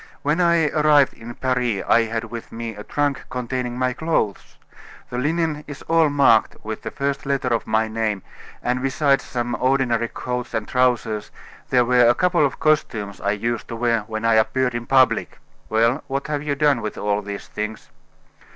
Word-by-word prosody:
When 150 +5 +1
I 170 -3 +3
arrived 150 -3 +4
in 120 +1 -10
Paris 125 -6 0
I 115 - +4
had 115 0 -3
with 115 0 -8
me 115 -1 -5
a 105 - -8
trunk 145 +2 -1
containing 125 -1 -3
my 125 0 0
clothes. 155 -10 -2 0.5
The 125 - -2
linen 155 +1 -1
is 145 -2 -9
all 165 -2 +3
marked 140 -6 +4
with 110 0 -5
the - - -5
first 140 0 -2
letter 140 -2 0
of 115 -1 -1
my 110 +1 +1
name, 110 -3 -2 0.4
and 125 +1 0
besides 135 +1 +2
some 120 -1 -3
ordinary 125 -3 +1
coats 125 +1 -4
and 110 -1 -2
trousers, 120 -4 0 0.4
there 125 -1 +4
were 125 -1 +5
a 120 - +4
couple 180 -4 +2
of 140 - 0
costumes 110 -10 0
I 100 +1 +1
used 115 +2 -3
to 115 - -6
wear 115 0 +1
when 110 0 -4
I 115 - +4
appeared 125 +3 +2
in 120 0 -4
public." 130 -1 +3 0.3
"Well, 115 +6 +2
what 135 0 -2
have 145 -1 -1
you 145 -1 -2
done 140 -4 +2
with 110 - -5
all 105 0 0
these 100 -1 -7
things?" 105 +1 -6
125 Hz, 185 wpm, -22 LUFS, 115-140 Hz, 0.5 s, were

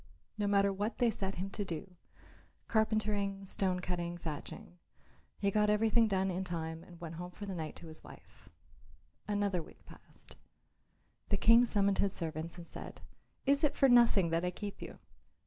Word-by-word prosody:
No 210 -2 -1
matter 200 0 +3
what 205 +4 -2
they 240 -2 +3
set 195 -2 -3
him 190 +2 -4
to 205 - -2
do 180 0 -6 0.7
carpentering, 210 -3 0
stone 185 -1 -1
cutting, 175 -1 -3
thatching 175 +4 -7 0.6
he 200 0 +1
got 210 +1 +3
everything 220 +2 +4
done 190 -2 +1
in 185 +1 -2
time 165 -2 -4
and 175 -2 -14
went 165 -1 -7
home 180 +1 -5
for 205 +3 -8
the 195 - -4
night 160 -4 -5
to - - -11
his 160 0 -11
wife. - - -15 0.8
Another 205 -3 0
week - - -16
passed. - - -13 0.9
The 200 - +2
King 230 +4 +6
summoned 200 -3 +2
his 200 -1 +2
servants 160 0 -4
and 170 - -8
said, - - -9 0.4
"Is 280 +2 +3
it 300 - +3
for 275 - +6
nothing 230 -8 +5
that 165 +1 +1
I 180 - +1
keep 200 +3 -7
you? - - -8
195 Hz, 175 wpm, -33 LUFS, 175-210 Hz, 0.9 s, King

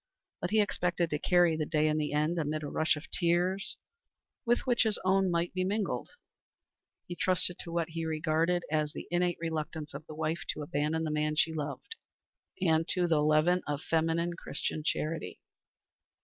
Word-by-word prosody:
But - - -1
he 215 0 +4
expected 175 -4 0
to 150 - 0
carry 175 -1 +4
the 155 -1 -2
day 155 -2 +2
in 155 0 +1
the 150 - -1
end, 155 +3 +1
amid 155 0 -2
a - - -3
rush 160 +2 +2
of 150 - -10
tears, 180 +2 +1 0.7
with 240 +1 +3
which 245 -2 +2
his 220 -3 +2
own 190 0 +3
might 170 0 0
be 185 0 0
mingled. 195 - -1 1.0
He 175 - -6
trusted 180 -1 0
to 170 - -5
what 170 -1 -1
he 165 0 -4
regarded 160 +2 +1
as 155 -1 0
the - - -7
innate 175 0 +1
reluctance 160 -2 -4
of 155 - -8
the 155 - -8
wife 160 +2 -1
to 150 - -5
abandon 150 +1 -1
the 155 - -1
man 150 0 0
she 160 +1 +3
loved, 150 - -5 0.6
and 165 -3 +2
to 180 -1 +1
the 160 -3 +3
leaven 155 +4 +4
of 145 0 -2
feminine 165 +1 +1
Christian 155 -1 -3
charity. 160 +1 -2
165 Hz, 180 wpm, -31 LUFS, 155-175 Hz, 1.0 s, he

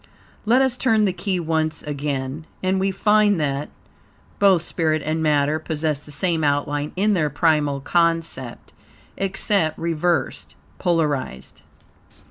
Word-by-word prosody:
Let 245 +5 +4
us 260 -2 0
turn 225 -5 +2
the 190 - 0
key 190 -1 -2
once 160 -1 -1
again, 145 +1 -4 0.2
and 190 +1 +1
we 195 +1 +1
find 210 0 +3
that, 140 -1 -2 0.7
both 190 -4 +4
spirit 155 -4 -1
and 155 +1 -1
matter 150 0 +2
possess 155 -2 -2
the 150 - -15
same 165 +2 0
outline 145 0 0
in 205 +3 +2
their 155 -6 +1
primal 145 -2 +1
concept, 165 -5 -1 0.4
except 195 -4 0
reversed 165 -1 -1 0.2
(polarized). 150 - -1
160 Hz, 125 wpm, -22 LUFS, 145-185 Hz, 0.7 s, Let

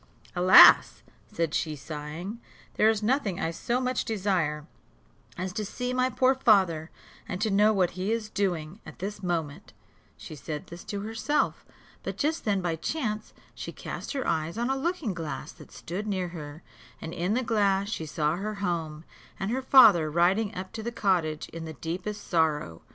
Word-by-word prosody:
"Alas!" 180 +1 +8 0.3
said 165 -6 -1
she, 155 -2 -1
sighing, 155 - -7 0.3
"there 215 - +4
is 220 -1 0
nothing 215 -6 0
I 165 - -1
so 235 +8 -1
much 255 -1 -1
desire 185 -8 -1 0.7
as 185 +1 -4
to 215 - -2
see 250 +5 -4
my 255 0 +2
poor 260 +1 +3
father 190 -11 +3 0.4
and 185 - -3
to 215 0 0
know 210 +2 +5
what 185 -4 +2
he 185 +4 -3
is 225 -2 -1
doing 185 -4 -2
at - - -12
this 200 +3 -5
moment," 165 -6 -3 0.4
She - - -10
said 150 +1 -6
this 170 +1 -10
to 205 -1 -4
herself; 225 +8 -1 0.3
but - - -5
just 315 +3 -1
then 200 -3 +1
by 170 -2 -1
chance, 215 - -3 0.2
she - - -7
cast - - -6
her 270 -2 -2
eyes 165 +3 -1
on 240 +3 0
a - - +1
looking 295 - -2
glass 165 -3 -5
that - - -15
stood 195 +6 -6
near 185 -3 -1
her, 155 -1 -9 0.4
and 160 - -7
in 180 +5 -1
the 255 - 0
glass 200 -4 +1
she 165 -7 -4
saw 155 +2 0
her 210 +3 -4
home, 165 -5 -3 0.4
and 195 +3 -2
her 260 +2 -1
father 220 - +7
riding 185 +7 +2
up 185 +1 -6
to 220 - -5
the 235 +2 -4
cottage 175 -9 0
in 165 0 -7
the 160 - -7
deepest 180 - -5
sorrow. 155 - 0
190 Hz, 180 wpm, -27 LUFS, 165-220 Hz, 0.7 s, Alas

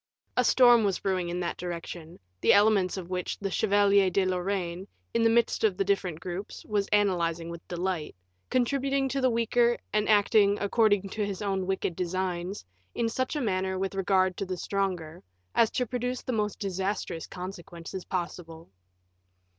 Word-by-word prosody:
A 250 - +3
storm 240 -2 +6
was 200 -2 +1
brewing 185 -3 -1
in 175 +1 -3
that 170 - -3
direction, 170 -1 -6 0.2
the - - +5
elements 200 -3 +4
of 180 -1 -7
which 180 -1 -2
the 195 -1 -4
Chevalier 200 -1 +4
de 190 +1 +1
Lorraine, 185 0 -2 0.3
in 230 - +2
the 225 - +5
midst 235 0 +2
of 205 -4 +2
the - - +2
different 190 -5 -1
groups, 180 +3 -6
was 205 -2 0
analyzing 170 -5 +1
with 170 -1 -10
delight, 175 -3 -3 0.3
contributing 270 +2 +1
to 275 +1 -1
the 260 - +4
weaker, 235 +1 +2 0.2
and 210 0 +1
acting, 205 -1 +4
according 205 -1 +2
to 215 +2 -2
his 200 0 -4
own 195 -2 -1
wicked 190 -2 -1
designs, 180 - -3 0.3
in 230 -1 0
such 260 +5 -2
a 295 - -1
manner 190 -4 -1
with 195 +1 -2
regard 190 -1 +2
to 200 - -2
the 185 0 -3
stronger, 180 -4 -2 0.3
as 230 - +4
to 250 - -1
produce 250 +1 -3
the 255 - -3
most 210 -2 -1
disastrous 190 -3 -3
consequences 180 -1 -7
possible. 170 - -5
195 Hz, 170 wpm, -28 LUFS, 180-215 Hz, 0.3 s, storm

